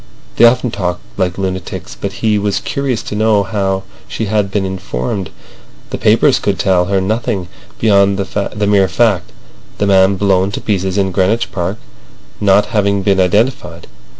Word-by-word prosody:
They 120 - +7
often 125 0 +3
talked 90 -3 -3
like 90 -1 -1
lunatics. 95 -2 -4
But 100 - -5
he 105 -1 +3
was 100 -1 -1
curious 135 -4 -2
to - - -5
know 105 -1 +2
how 95 -1 -2 0.2
she 110 - -3
had 105 -1 0
been 100 0 -1
informed. 95 -2 -4 0.6
The - - -4
papers - - +3
could - - -1
tell 90 -2 +2
her 100 +1 +1
nothing 105 -2 -2 0.3
beyond 100 -2 +3
the 105 +1 -2
mere 100 -2 +4
fact: 110 -4 +1 0.5
the 100 - 0
man 95 0 +4
blown 95 -1 +2
to - - -3
pieces 95 -2 -1
in 95 -1 +1
Greenwich 95 +6 0
Park 90 +3 -3 0.6
not 100 0 +4
having 100 -2 +1
been 95 0 +2
identified. 100 - 0
100 Hz, 160 wpm, -15 LUFS, 95-105 Hz, 0.6 s, They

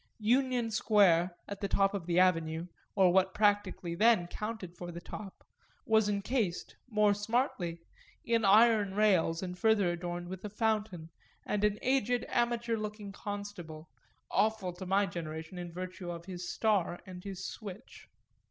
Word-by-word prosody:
Union 245 +1 +1
Square, 185 -5 +3
at 200 0 -7
the 200 - 0
top 195 0 +2
of 190 -4 -4
the 175 0 +1
Avenue 165 -3 +2 0.3
or 185 -3 +5
what 190 0 +3
practically 205 -4 +1
then 215 0 +4
counted 200 -1 -6
for 175 0 -7
the 170 - -7
top 195 +2 -9 0.4
was 220 -1 +3
encased, 200 -2 -1
more 210 -2 +3
smartly, 205 -5 -1 0.5
in 230 -1 +2
iron 210 -1 +5
rails 185 -5 +3
and 180 -1 -6
further 215 -5 +3
adorned 175 0 -4
with 185 0 -7
a 210 - -4
fountain 210 -6 -1 0.3
and 210 0 -1
an 210 0 +2
aged 250 -2 +1
amateur 235 -1 0
looking 210 -1 -5
constable, 200 -6 -7 0.4
awful 215 -4 +1
to 180 +1 -8
my 195 +2 +3
generation 165 -1 -6
in 175 -1 -6
virtue 180 0 -6
of 170 -1 -6
his 180 -1 -6
star 200 -6 +1
and 180 -1 -9
his 190 -1 -6
switch. 205 -2 -9
195 Hz, 150 wpm, -31 LUFS, 175-215 Hz, 0.5 s, or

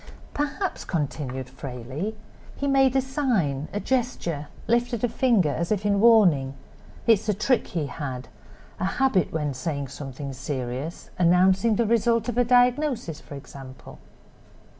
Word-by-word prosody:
"Perhaps," 295 +7 -2
continued 135 -5 -3
Frayley, 135 - -6 0.4
"he 280 - -4
made 270 -2 +3
a 265 - +4
sign, 225 - 0
a 205 - -2
gesture—lifted 235 - -1
a - - +4
finger, 230 - +2
as 170 +5 -2
in 205 -1 +1
warning. 180 - +5 0.5
It's 220 -2 +3
a 210 - +2
trick 235 +4 +1
he 165 -4 -2
had—a 135 +2 -8
habit 195 - +1
when 150 -3 -1
saying 140 0 -3
something 135 0 -7
serious—announcing 170 - +1
the 235 - +2
result 230 0 +2
of 245 0 -1
a - - +5
diagnosis, 245 - +2
for 145 - -10
example." 135 -2 -11
185 Hz, 125 wpm, -25 LUFS, 140-235 Hz, 0.5 s, warning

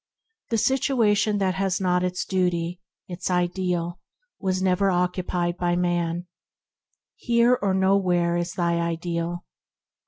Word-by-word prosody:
"The 230 - +1
situation 225 -5 +2
that 190 -2 +1
has 190 0 -1
not 180 -1 +1
its 180 0 -2
Duty, 180 -1 -1 0.3
its 180 0 -5
Ideal, 180 -1 -1 0.4
was 185 -2 -1
never 190 +1 +2
yet 185 - +1
occupied 180 -1 -1
by 175 -1 0
man.... 175 -1 -1 0.9
Here 235 0 +3
or 195 -2 +1
nowhere 185 -3 +2
is 175 0 -2
thy 170 -2 0
Ideal. 170 +1 -3
180 Hz, 125 wpm, -24 LUFS, 175-190 Hz, 0.9 s, Here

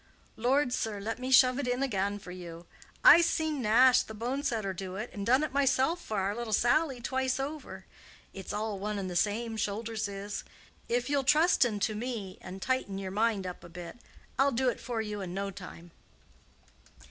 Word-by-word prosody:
"Lord, 250 +3 +1
sir, 215 -4 -2
let 225 +4 -4
me 255 +1 -4
shove 255 0 +6
it 280 - -2
in 250 +2 0
again 200 -5 -1
for 195 -3 -10
you! 175 -2 -9 0.4
I's 340 0 +9
seen 315 -4 -1
Nash, 250 +3 +6
the 220 - -8
bone 245 +6 -2
setter, 220 -8 -1
do 185 0 -6
it, 215 +5 -5
and 200 -1 -5
done 260 +5 +4
it 305 - -3
myself 280 +4 +2
for 215 - -4
our 195 +2 0
little 235 -2 -4
Sally 260 +4 +2
twice 260 +1 -1
over. 270 -10 -6 0.5
It's 190 -1 -7
all 210 -1 -3
one 210 +1 -3
and 190 -2 -4
the - - -5
same, 220 +5 0
shoulders 220 +1 -2
is. 200 0 -5 0.5
If 245 +1 0
you'll 285 -1 +1
trusten 285 - +3
to 215 - +1
me 215 -4 -5
and 185 +1 -8
tighten 260 -7 -1
your 190 -1 -5
mind 210 -1 +1
up 180 -1 -7
a 175 - -11
bit, 175 +6 -9 0.4
I'll 275 +1 +4
do 255 +1 +1
it 240 - -4
for 235 -3 -3
you 210 -1 -5
in 180 -1 -5
no 200 0 -2
time." 175 -2 -11
225 Hz, 195 wpm, -30 LUFS, 195-260 Hz, 0.5 s, I's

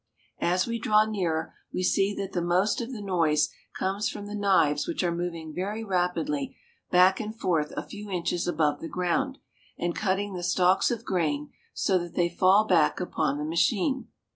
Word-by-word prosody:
As 180 +2 +2
we 230 0 -3
draw 215 -1 +4
nearer, 175 -7 -2 0.2
we 185 - -2
see 195 +2 +2
that 195 -1 -4
the 175 - 0
most 180 +6 +1
of 235 +2 -5
the 220 -5 -6
noise 165 -6 +2 0.3
comes 195 +3 -1
from 205 - -7
the 205 - -7
knives 195 - +2
which 335 - -2
are 175 -1 +1
moving 170 -2 -4
very 205 +6 -3
rapidly 220 +9 -1 0.3
back 185 +1 +5
and 220 +1 -6
forth 165 -8 0
a - - -2
few 205 0 -9
inches 175 -1 -1
above 155 -3 +1
the 165 - -6
ground, 260 +10 -1 0.4
and 175 0 -1
cutting 200 0 -1
the 180 - -4
stalks 180 +1 +3
of 235 -3 -3
grain 150 -5 -1 0.2
so 190 -2 +2
that 175 -1 -7
they 175 -1 +2
fall 190 +4 +4
back 170 -7 +3
upon 155 -5 -1
the 150 - -3
machine. 200 - +1
185 Hz, 185 wpm, -27 LUFS, 170-210 Hz, 0.4 s, back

